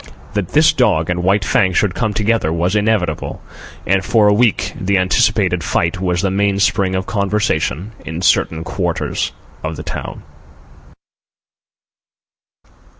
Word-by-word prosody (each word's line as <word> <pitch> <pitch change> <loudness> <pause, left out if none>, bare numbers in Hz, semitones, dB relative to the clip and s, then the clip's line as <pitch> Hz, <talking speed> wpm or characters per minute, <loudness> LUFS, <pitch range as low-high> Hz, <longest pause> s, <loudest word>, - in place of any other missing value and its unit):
That 105 -4 -3
this 155 +1 +5
dog 90 -10 +1
and 90 0 -1
White 95 +2 +1
Fang 100 -8 +2
should 95 0 +1
come 110 -3 -1
together 105 -4 0
was 85 +4 0
inevitable, 105 -3 -1 0.5
and 95 0 +1
for 110 +2 +3
a 105 - +5
week 115 +1 +1
the 100 +1 +1
anticipated 95 0 +1
fight 95 - -1
was 90 0 0
the 95 - +1
mainspring 100 -1 +1
of 95 0 -2
conversation 100 - -1
in 80 +2 -6
certain 80 -2 +2
quarters 90 -1 -2 0.3
of 80 0 -3
the - - -7
town. - - -6
95 Hz, 135 wpm, -17 LUFS, 90-105 Hz, 0.5 s, this